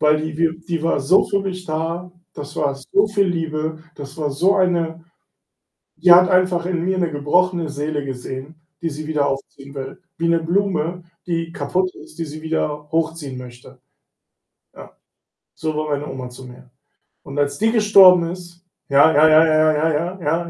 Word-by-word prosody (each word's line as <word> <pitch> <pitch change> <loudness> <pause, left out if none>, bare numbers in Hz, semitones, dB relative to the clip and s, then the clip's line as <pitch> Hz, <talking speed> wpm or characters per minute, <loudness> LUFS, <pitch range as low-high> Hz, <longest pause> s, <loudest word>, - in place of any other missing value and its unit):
Weil 150 0 +4
die 155 -1 -5
wir 165 0 0
die 165 -1 -4
war 165 -3 +1
so 140 +8 +4
für 200 - 0
mich 185 -2 -5
da, 165 +3 -3 0.2
das 145 0 -9
war 140 -2 0
so 195 +10 +1
viel 200 -2 +1
Liebe, 160 -2 -3 0.2
das 140 +1 -10
war 150 -2 -1
so 180 +8 +2
eine 170 -3 0 0.9
die 175 +2 +6
hat 180 +1 +7
einfach 185 -2 +2
in 175 -2 -2
mir 190 +1 0
'ne 175 -2 0
gebrochene 170 +3 0
Seele 145 0 -3
gesehen, 130 +3 -7 0.3
die 165 - -1
sie 150 +1 -7
wieder 150 -2 0
aufziehen 135 +1 -7
will, 135 -1 -8 0.2
wie 170 0 0
'ne 170 0 +2
Blume, 175 -1 -1 0.2
die 165 -1 -3
kaputt 185 +5 -1
ist, - - -15
die 165 - -2
sie 155 +1 -9
wieder 150 -2 -3
hochziehen 160 -5 -2
möchte. 125 -1 -13 1.0
Ja. - - -13 0.6
So 155 -1 -3
war 155 0 -2
meine 145 0 -2
Oma 130 -2 -7
zu 125 +1 -12
mir 125 0 -14 0.5
und 140 - -9
als 145 0 0
die 220 +1 +2
gestorben 195 -6 +6
ist 175 0 -11 0.2
ja, 145 +3 +5
ja, 155 +2 +6
ja, 155 +1 +6
ja, 155 0 +3
ja, 155 +2 +1
ja, 175 +5 -3
ja, 165 +2 -1
160 Hz, 180 wpm, -20 LUFS, 145-175 Hz, 1.0 s, hat